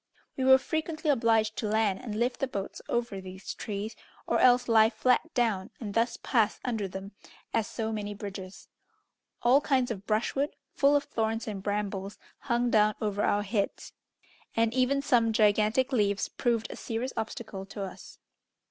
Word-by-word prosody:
We 260 Hz, -, -2 dB
were 265 Hz, 0 st, +8 dB
frequently 315 Hz, +2 st, -1 dB
obliged 225 Hz, -4 st, +2 dB
to 215 Hz, -, -1 dB
land 210 Hz, -2 st, +1 dB
and 220 Hz, -4 st, -5 dB
lift 245 Hz, +1 st, 0 dB
the 270 Hz, -, 0 dB
boats 200 Hz, -6 st, -5 dB
over 235 Hz, -5 st, -1 dB
these 190 Hz, +1 st, -7 dB
trees, 210 Hz, +1 st, -5 dB, 0.3 s
or -, -, +1 dB
else 250 Hz, -1 st, +5 dB
lie 220 Hz, -1 st, +6 dB
flat 250 Hz, +7 st, +1 dB
down, 220 Hz, -6 st, +1 dB
and 210 Hz, -4 st, -5 dB
thus 230 Hz, +1 st, +1 dB
pass 225 Hz, -4 st, +2 dB
under 225 Hz, -5 st, -1 dB
them 190 Hz, +1 st, -7 dB, 0.4 s
as 225 Hz, -1 st, +1 dB
so 225 Hz, -1 st, -3 dB
many 205 Hz, -1 st, -4 dB
bridges. 195 Hz, -2 st, -8 dB, 0.8 s
All 255 Hz, +4 st, +5 dB
kinds 260 Hz, -4 st, +1 dB
of 200 Hz, -2 st, -6 dB
brushwood, 240 Hz, +7 st, 0 dB, 0.2 s
full 285 Hz, +1 st, +4 dB
of 290 Hz, -, +3 dB
thorns 225 Hz, -1 st, -2 dB
and 205 Hz, -3 st, -4 dB
brambles, 205 Hz, -1 st, -3 dB, 0.2 s
hung 240 Hz, -2 st, 0 dB
down 215 Hz, -1 st, +4 dB
over 205 Hz, -2 st, -1 dB
our 205 Hz, 0 st, +2 dB
heads, 205 Hz, 0 st, -2 dB, 0.6 s
and 230 Hz, 0 st, +2 dB
even 260 Hz, +2 st, +2 dB
some 230 Hz, -4 st, +3 dB
gigantic 215 Hz, +4 st, +3 dB
leaves 205 Hz, -5 st, +1 dB
proved 235 Hz, -3 st, -1 dB
a -, -, -6 dB
serious 235 Hz, +3 st, -4 dB
obstacle 220 Hz, -3 st, -5 dB
to 200 Hz, 0 st, -6 dB
us. 190 Hz, -, -9 dB
225 Hz, 165 wpm, -29 LUFS, 205-245 Hz, 0.8 s, were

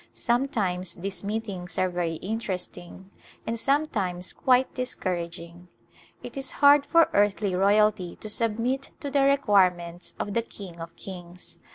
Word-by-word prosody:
Sometimes 210 Hz, -8 st, 0 dB
these 195 Hz, +3 st, -5 dB
meetings 200 Hz, -4 st, -4 dB
are 185 Hz, -, +3 dB
very 175 Hz, -2 st, -2 dB
interest 200 Hz, -2 st, -3 dB
ing 185 Hz, +2 st, -12 dB, 0.3 s
and 230 Hz, 0 st, -2 dB
sometimes 210 Hz, -11 st, 0 dB
quite 260 Hz, 0 st, +3 dB
discouraging. 175 Hz, -7 st, -4 dB, 0.6 s
It -, -, -8 dB
is 270 Hz, -1 st, -4 dB
hard 285 Hz, 0 st, +6 dB
for 335 Hz, +2 st, +5 dB
earthly 205 Hz, -1 st, +2 dB
royalty 200 Hz, -1 st, +3 dB
to -, -, -9 dB
submit 230 Hz, +5 st, -1 dB
to 285 Hz, -4 st, -5 dB
the 280 Hz, 0 st, +3 dB
requirements 185 Hz, -11 st, +2 dB
of 205 Hz, -, -3 dB
the 230 Hz, -, +2 dB
King 190 Hz, -6 st, -10 dB
of 165 Hz, 0 st, -8 dB
kings. 180 Hz, -2 st, -10 dB
200 Hz, 140 wpm, -26 LUFS, 180-245 Hz, 0.6 s, hard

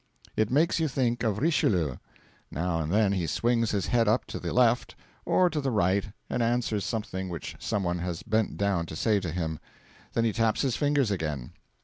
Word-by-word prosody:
It 110 Hz, -1 st, +1 dB
makes 155 Hz, +6 st, +2 dB
you 160 Hz, -, +2 dB
think 125 Hz, -3 st, 0 dB
of 110 Hz, -4 st, 0 dB
Richelieu. 95 Hz, -, +1 dB, 0.5 s
Now 85 Hz, 0 st, -1 dB
and 80 Hz, 0 st, -2 dB
then 105 Hz, 0 st, +3 dB
he 90 Hz, -4 st, 0 dB
swings 115 Hz, +5 st, +1 dB
his 100 Hz, -3 st, 0 dB
head 115 Hz, -2 st, +2 dB
up 110 Hz, +4 st, +2 dB
to -, -, -3 dB
the -, -, -4 dB
left 125 Hz, -1 st, +2 dB, 0.3 s
or 185 Hz, -, +4 dB
to 150 Hz, -, -1 dB
the 135 Hz, -, 0 dB
right 100 Hz, -3 st, +2 dB, 0.2 s
and -, -, -1 dB
answers 115 Hz, -3 st, 0 dB
something 95 Hz, -5 st, -3 dB
which 80 Hz, -3 st, -6 dB
some 105 Hz, +1 st, -1 dB
one 90 Hz, 0 st, -1 dB
has 90 Hz, +2 st, -4 dB
bent 110 Hz, -1 st, 0 dB
down 100 Hz, -4 st, 0 dB
to 80 Hz, -, -7 dB
say 105 Hz, +4 st, +2 dB
to 90 Hz, -4 st, -4 dB
him. 80 Hz, -2 st, -3 dB, 0.5 s
Then 115 Hz, -, +1 dB
he 110 Hz, -, +1 dB
taps 115 Hz, +2 st, +1 dB
his 130 Hz, -4 st, +1 dB
fingers 145 Hz, -6 st, +2 dB
again. 75 Hz, -9 st, -3 dB
105 Hz, 205 wpm, -28 LUFS, 90-120 Hz, 0.5 s, or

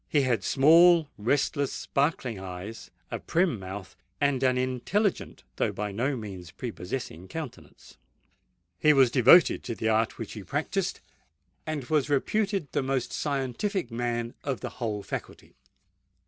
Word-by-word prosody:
He 145 Hz, -2 st, +3 dB
had 120 Hz, -6 st, +1 dB
small, 165 Hz, -, +6 dB
restless, 140 Hz, +5 st, 0 dB
sparkling 135 Hz, -6 st, -1 dB
eyes, 95 Hz, +4 st, -8 dB, 0.2 s
a -, -, -3 dB
prim 170 Hz, -, +1 dB
mouth, 95 Hz, 0 st, -8 dB, 0.2 s
and 140 Hz, -2 st, +1 dB
an 130 Hz, -1 st, +3 dB
intelligent 130 Hz, -, -1 dB
though -, -, +1 dB
by 105 Hz, 0 st, -4 dB
no 125 Hz, +8 st, -1 dB
means 95 Hz, -6 st, -8 dB
prepossessing 90 Hz, -2 st, -6 dB
countenance. 150 Hz, -4 st, -9 dB, 0.8 s
He 150 Hz, -, +5 dB
was 135 Hz, -4 st, +5 dB
devoted 135 Hz, +8 st, +6 dB
to 115 Hz, -, -3 dB
the 110 Hz, -, -1 dB
art 110 Hz, +1 st, +1 dB
which -, -, -6 dB
he -, -, -8 dB
practised, -, -, -2 dB, 0.7 s
and 155 Hz, -3 st, -2 dB
was 150 Hz, +1 st, +1 dB
reputed 195 Hz, +3 st, 0 dB
the -, -, 0 dB
most 130 Hz, -2 st, -2 dB
scientific 140 Hz, -, -2 dB
man 120 Hz, 0 st, -2 dB
of 135 Hz, -3 st, -3 dB
the -, -, -4 dB
whole 105 Hz, -3 st, -2 dB
faculty. -, -, -7 dB
130 Hz, 140 wpm, -27 LUFS, 110-150 Hz, 0.8 s, small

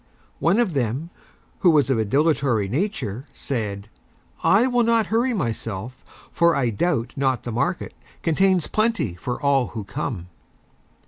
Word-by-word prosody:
One 170 Hz, +6 st, +3 dB
of 220 Hz, -8 st, +1 dB
Them, 135 Hz, +5 st, -2 dB, 0.5 s
who 180 Hz, -, +5 dB
was 145 Hz, -4 st, +4 dB
of 120 Hz, -, +2 dB
a 110 Hz, -, +1 dB
Dilatory 135 Hz, -4 st, +2 dB
Nature, 135 Hz, -, -2 dB
said: 105 Hz, -6 st, -4 dB, 0.6 s
"I 210 Hz, +5 st, +5 dB
will 245 Hz, -1 st, +2 dB
not 230 Hz, -1 st, +3 dB
Hurry 240 Hz, +3 st, +2 dB
Myself, 115 Hz, -, -4 dB, 0.3 s
for 170 Hz, 0 st, +3 dB
I 125 Hz, -4 st, +1 dB
Doubt 120 Hz, -, -1 dB
Not 135 Hz, -4 st, 0 dB
the 120 Hz, -, -4 dB
Market 170 Hz, +10 st, -1 dB, 0.3 s
contains 185 Hz, +1 st, +3 dB
Plenty 215 Hz, -, 0 dB
for 120 Hz, +8 st, -4 dB
all 140 Hz, -3 st, +2 dB
who 110 Hz, -3 st, -6 dB
come." 100 Hz, -, -4 dB
140 Hz, 145 wpm, -23 LUFS, 115-180 Hz, 0.6 s, who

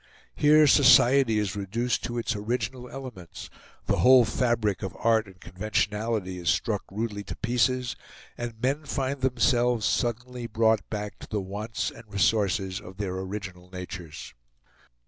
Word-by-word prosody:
Here 150 Hz, +1 st, +5 dB
society 130 Hz, -3 st, +6 dB
is 100 Hz, -3 st, -1 dB
reduced 110 Hz, +5 st, -2 dB
to 120 Hz, 0 st, -4 dB
its 115 Hz, -1 st, -1 dB
original 120 Hz, +3 st, -3 dB
elements, 125 Hz, -11 st, -9 dB, 0.3 s
the -, -, +1 dB
whole 125 Hz, -1 st, +7 dB
fabric 110 Hz, -3 st, 0 dB
of -, -, -5 dB
art 110 Hz, -2 st, +2 dB
and 95 Hz, -1 st, -16 dB
conventionality 105 Hz, -1 st, -2 dB
is 85 Hz, -3 st, -1 dB
struck 105 Hz, +6 st, 0 dB
rudely 105 Hz, 0 st, -3 dB
to -, -, -6 dB
pieces, 125 Hz, +1 st, 0 dB, 0.4 s
and 120 Hz, -2 st, -6 dB
men 135 Hz, +5 st, 0 dB
find 135 Hz, 0 st, -2 dB
themselves 125 Hz, -3 st, +2 dB
suddenly 120 Hz, 0 st, -1 dB
brought 110 Hz, -1 st, +1 dB
back 105 Hz, -1 st, -5 dB
to -, -, -10 dB
the 105 Hz, -, -2 dB
wants 100 Hz, +4 st, -4 dB
and 115 Hz, -2 st, -15 dB
resources 100 Hz, -2 st, +1 dB
of 95 Hz, -2 st, -12 dB
their 100 Hz, -3 st, -3 dB
original 95 Hz, -1 st, -6 dB
natures. 90 Hz, -3 st, -8 dB
110 Hz, 145 wpm, -27 LUFS, 100-125 Hz, 0.4 s, whole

